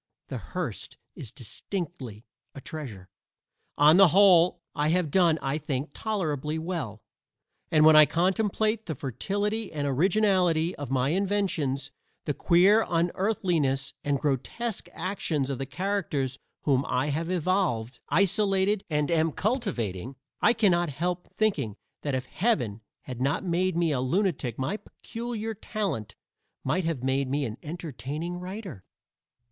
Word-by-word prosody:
The - - -4
Hearst - - -5 0.2
is - - -9
distinctly 145 - -6 0.3
a - - -7
treasure. 125 - -7 0.7
On 150 +3 +7
the 195 -1 +9
whole, 175 -1 +5
I 150 0 0
have 165 -2 +1
done, 170 -3 +4
I 135 +3 -1
think, 140 0 -3
tolerably 155 -9 -2
well, 160 - -4 0.7
and 155 -1 +5
when 155 0 +8
I 155 -1 +9
contemplate 215 +5 +1
the 160 - -3
fertility 205 - -2
and 145 -2 -2
originality 175 +2 +2
of 145 -3 -6
my 130 0 +1
inventions, 170 -7 0 0.3
the 145 - 0
queer 190 +8 +5
unearthliness 170 -5 0
and 145 -1 0
grotesque 165 - -2
actions 165 -6 -2
of 135 - -4
the 135 - -3
characters 150 -6 -2 0.2
whom 135 -2 +2
I 130 +4 0
have 160 +4 -2
evolved, 175 - 0
isolated 195 +1 +2
and 150 0 0
am 160 -1 +2
cultivating, 135 - -2 0.3
I 230 - +5
cannot 175 -7 +3
help 175 +5 -2
thinking 150 - 0 0.3
that 145 -3 -1
if 130 0 -2
Heaven 125 - 0 0.2
had 125 -1 -7
not 145 +7 +1
made 180 0 0
me 170 -2 +2
a 130 -3 0
lunatic 135 - 0
my 135 +10 -1
peculiar 225 0 -6
talent 175 - -4 0.5
might 165 +6 0
have 160 -7 -2
made 135 0 +1
me 140 +1 0
an 110 -1 -5
entertaining 160 +1 -5
writer. 185 - -7
165 Hz, 135 wpm, -27 LUFS, 135-190 Hz, 0.7 s, the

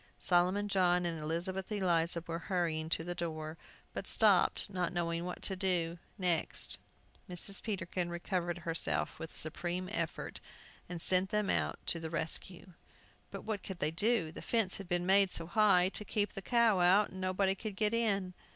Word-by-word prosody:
Solomon 185 +3 +2
John 180 -3 +2
and 165 -2 -2
Elizabeth 180 +6 -3
Eliza 170 -4 +1
were 165 0 -4
hurrying 165 -4 -1
to 165 - +1
the 175 +1 -4
door, 155 -2 -4 0.4
but - - -5
stopped, - - +4
not 180 -3 -2
knowing 170 -1 -2
what 180 - -6
to 190 - 0
do 175 -3 0 0.2
next. 180 -4 +1 0.5
Mrs. 180 +3 0
Peterkin 180 -4 -3
recovered 175 0 -2
herself 80 - -1
with 160 - -6
a - - -13
supreme 175 +3 -2
effort, - - -3 0.5
and 175 -1 -5
sent 185 +3 +2
them 210 -2 +1
out - - 0
to 170 - 0
the 160 -1 -5
rescue. 170 +3 -2 0.6
But - - -8
what 215 -3 -3
could 190 - -7
they 155 -2 0
do? 200 -1 +1
The - - -9
fence 225 -5 +1
had 195 -3 -9
been 175 -1 0
made 195 +1 +5
so 165 - +2
high, 185 0 +4
to 210 - -1
keep 205 0 -1
the 195 - -5
cow 230 -2 +3
out, 190 +4 +4
that - - -12
nobody 190 +1 +1
could 205 +1 -6
get 210 +1 +1
in. 200 -5 0
180 Hz, 180 wpm, -33 LUFS, 170-195 Hz, 0.6 s, made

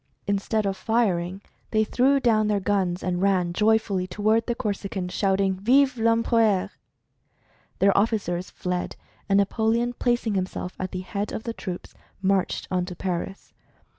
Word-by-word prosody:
Instead 200 +1 0
of 195 -1 0
firing, 190 -3 0 0.3
they 215 -1 +2
threw 265 +5 +3
down 220 -4 +3
their 210 -1 +1
guns 190 -2 0
and 180 -1 -1
ran 185 -3 +2
joyfully 210 -2 +2
toward 215 +4 +1
the 240 - 0
Corsican 200 -4 -3
shouting, 195 +1 +1
"Vive 255 +7 +3
I'Empereur!" 230 -3 +2 1.1
Their 195 0 +3
officers 200 -4 0
fled, 180 0 -3 0.3
and 195 - +4
Napoleon, 225 +4 +1
placing 240 -3 0
himself 185 -1 -3
at 185 - -3
the 185 - -5
head 200 +2 -4
of 220 - -5
the 230 - -4
troops, 185 -5 -7 0.3
marched 195 -1 0
on 180 -1 +1
to 180 -1 -7
Paris. 185 +2 -4
200 Hz, 145 wpm, -25 LUFS, 185-220 Hz, 1.1 s, and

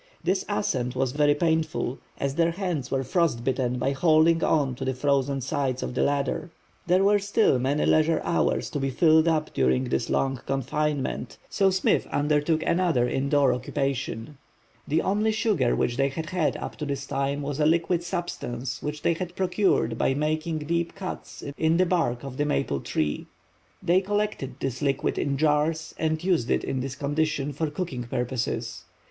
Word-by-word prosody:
This 190 +1 +1
ascent 125 +3 -1
was 130 -1 0
very 145 +1 +3
painful, 160 -4 0 0.2
as 140 -1 -1
their 165 +2 +2
hands 175 -8 -3
were 135 0 0
frostbitten 130 -6 0
by 135 +2 0
holding 160 +3 +4
on 140 -5 +2
to 125 - -6
the 130 -1 -1
frozen 140 0 +1
sides 130 0 -1
of - - -4
the - - 0
ladder. 140 +2 0 0.4
There 180 +2 +4
were 205 +1 +4
still 200 - +2
many 140 +4 +1
leisure 155 +1 +3
hours 170 - 0
to 145 - -2
be 135 0 0
filled 160 +4 +4
up 155 -2 0
during 65 -1 +2
this 65 +1 -1
long 135 -2 0
confinement, 140 +2 -2
so 195 -1 +3
Smith 190 0 +1
undertook 150 +2 +1
another 170 -9 +2
indoor 140 +2 +2
occupation. 135 0 -3 0.5
The 155 +3 +1
only 210 +3 +1
sugar 210 - +1
which 120 - 0
they 135 0 +2
had 155 +4 -5
had 180 -4 0
up - - -6
to 150 - -4
this 140 -1 -3
time 140 +1 -2
was 145 +1 -3
a 150 - +4
liquid 170 +1 +2
substance 125 -9 -4
which 150 0 -5
they 170 - +3
had 175 +1 -5
procured 185 - +1
by 135 - +2
making 155 +1 -1
deep 170 +1 -1
cuts 195 -2 -7 0.2
in 160 +1 +3
the 185 - +4
bark 155 -10 0
of 135 -2 -7
the 145 - +1
maple 140 - 0
tree. 75 +2 -2 0.6
They 180 +2 +4
collected 205 -9 -2
this 130 -2 -3
liquid 140 -2 0
in 140 -1 0
jars 155 +2 +1
and 160 0 0
used 175 -10 +1
it - - +1
in 130 - -2
this 130 0 -4
condition 145 0 -1
for 155 +3 -2
cooking 145 -6 -4
purposes. 120 -1 -3
145 Hz, 175 wpm, -26 LUFS, 130-165 Hz, 0.6 s, holding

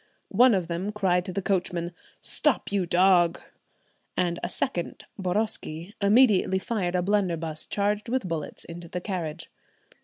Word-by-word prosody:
One 245 -2 +6
of 180 -3 -1
them 175 +4 -2
cried 185 -4 +1
to - - -4
the 195 +2 -3
coachman, 180 -3 -1 0.3
"Stop, - - +1
you 195 -3 0
dog!" 175 -1 +4 0.8
and 175 -1 +1
a - - -2
second, 175 - -3
Boroski, 185 -2 -2
immediately 200 -3 +5
fired 190 -3 -2
a 180 - +1
blunderbuss 170 -6 -1
charged 205 +2 -1
with 255 -5 0
bullets 160 -4 -4
into 170 0 -9
the 180 - -4
carriage. 175 -4 -4
185 Hz, 145 wpm, -26 LUFS, 170-200 Hz, 0.8 s, One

